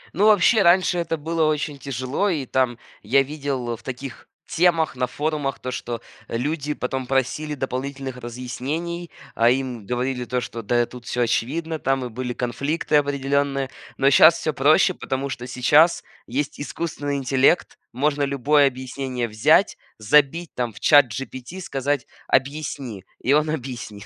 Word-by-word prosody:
Ну, 205 +5 +4
вообще, 215 +1 +5
раньше 180 0 +4
это 165 -1 -1
было 160 +2 -1
очень 150 -1 -1
тяжело, 135 - -2
и 155 -7 -1
там 125 -2 0 0.2
я 135 +6 +3
видел 135 -4 -3
в - - -16
таких 130 0 -8 0.2
темах 165 -4 +2
на 125 0 0
форумах 145 0 -2
то, 130 - -5
что 120 -2 -5 0.3
люди 145 +4 -2
потом 130 0 -3
просили 135 +3 -1
дополнительных 135 0 -4
разъяснений, 135 +8 -5 0.2
а 115 +1 +4
им 125 -5 -2
говорили 125 +1 -2
то, 125 +1 -1
что: 115 -1 -6
"Да, 120 +3 +1
тут 125 0 -12
всё 125 - -1
очевидно". 155 +7 -1
Там 135 -2 0
и - - -5
были 125 +1 -4
конфликты 140 +6 0
определенные. 140 -1 0 0.3
Но 135 +1 +4
щас 160 +4 +7
всё 155 - -2
проще, 155 +8 +4
потому 135 -4 -3
что 125 -2 -6
сейчас 145 +7 +4 0.2
есть 140 +4 -3
искусственный 145 -1 -3
интеллект, 135 +4 +2
можно 145 +2 0
любое 140 +1 +3
объяснение 130 -1 -4
взять, 110 0 +3 0.2
забить, 150 +9 +2
там, 120 -2 -3
в 100 - -12
ChatGPT, 135 - +2
сказать: 140 -5 -2 0.2
"Объясни"- 135 -6 -1 0.2
и 135 - +3
он 150 +1 +3
объяснит. 120 -8 -5
135 Hz, 150 wpm, -23 LUFS, 125-150 Hz, 0.3 s, щас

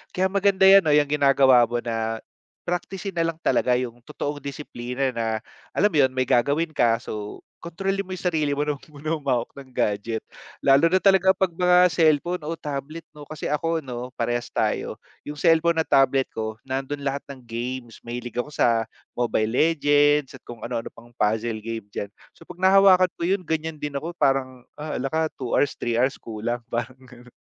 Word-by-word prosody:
Kaya 190 +1 +2
maganda 195 -1 +2
‘yan 195 0 +8
'no, 150 - +3
‘yang 145 -1 +3
ginagawa 135 -4 +5
mo 120 +1 -2
na 115 -1 -2 0.4
praktisin 185 +2 -4
nalang 165 -1 -1
talaga 125 - +2
yung 120 -1 -3
totoong 145 -1 -4
disiplina 135 -2 -4
na 115 -2 -3 0.5
alam 205 - +4
mo 160 - 0
‘yon, 130 -2 +4
may 130 -1 0
gagawin 140 +6 +2
ka, 120 -5 +2
so 105 -1 -7 0.2
kontrolin 195 +4 -2
mo 195 - -12
yung 185 0 -6
sarili 155 -5 0
mo 145 - 0
na 150 - 0
huwag 150 +4 -14
muna 155 +2 -4
humawak 135 -6 -1
ng 140 -1 -12
gadget. 110 -2 -2 0.4
Lalo 140 +4 +5
na 185 - +4
talaga 190 -1 +4
‘pag 190 -2 -1
mga 180 +1 +5
cellphone 160 +2 +2
o 160 - -2
tablet 150 +3 -6
'no, 150 - -13
kasi 155 +1 -8
ako 165 +2 0
‘no, 125 -1 -6
parehas 120 +1 -1
tayo. - - -1 0.3
Yung 150 0 -7
cellphone 165 +1 +3
at - - -4
tablet 135 -1 +4
ko, 110 -1 -4
nandun 135 +2 -4
lahat 140 0 -1
ng 135 -2 -9
games, 120 0 -5
mahilig 120 0 -6
ako 125 +4 -2
sa 115 -4 +2 0.3
Mobile 115 -3 +1
Legends 145 -1 +3
at - - -31
kung 120 -2 -10
ano-ano 115 -1 -4
pang 115 +1 -16
puzzle 110 0 -1
game 115 -1 -5
diyan. 100 0 -5 0.2
So - - -17
'pag 180 - -11
nahawakan 190 -1 +6
ko - - -15
yun, 195 0 +1
ganiyan 160 0 -2
din 150 -1 -5
ako 155 +5 -4
parang, 130 -3 0
ah, 150 +1 -4
hala 135 +2 -2
ka 160 0 +1
2 125 -3 -4
hours, 145 - +2
3 120 -1 -1
hours 130 +2 +1
kulang 115 +2 -4
pa, 120 0 -2
yung 130 - -19
gano’n. 125 0 -16
140 Hz, 190 wpm, -24 LUFS, 120-165 Hz, 0.5 s, yan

